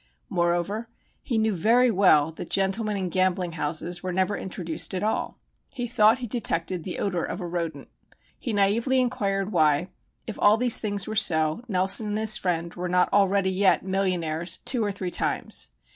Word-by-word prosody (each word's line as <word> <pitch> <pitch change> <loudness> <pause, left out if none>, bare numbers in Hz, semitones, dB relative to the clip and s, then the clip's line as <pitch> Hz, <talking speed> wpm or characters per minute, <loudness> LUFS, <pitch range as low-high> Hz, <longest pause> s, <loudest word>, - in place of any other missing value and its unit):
Moreover, 175 +4 -1 0.3
he 235 - -2
knew 220 -1 +1
very 235 +7 +3
well 165 -7 +4
that 160 - -9
gentlemen 200 +2 0
in 185 -2 -3
gambling 185 0 0
houses 165 +3 -2
were 185 - -4
never 190 +3 0
introduced 175 0 -3
at 185 - -3
all. 215 - -2 0.3
He 255 -4 -5
thought 225 -1 +3
he 255 - -6
detected 185 -7 -1
the 180 - -5
odor 180 -4 -2
of - - -5
a 180 - -5
rodent. 170 -2 -4 0.5
He 240 - -4
naïvely 220 +6 +1
inquired 205 -6 -1
why, 155 0 +2 0.4
if 220 - -7
all 210 +2 +5
these 245 0 +4
things 205 -3 -2
were 215 - -4
so, 160 -3 +2
Nelson 190 +1 +3
and 210 0 -2
his 215 -1 +2
friend 170 -2 -2
were 180 0 -5
not 180 0 +1
already 195 -1 +2
yet 190 0 +2
millionaires 180 -4 -1
two 245 -4 +2
or 205 - -1
three 190 -2 -5
times? - - -1
190 Hz, 175 wpm, -25 LUFS, 175-215 Hz, 0.5 s, all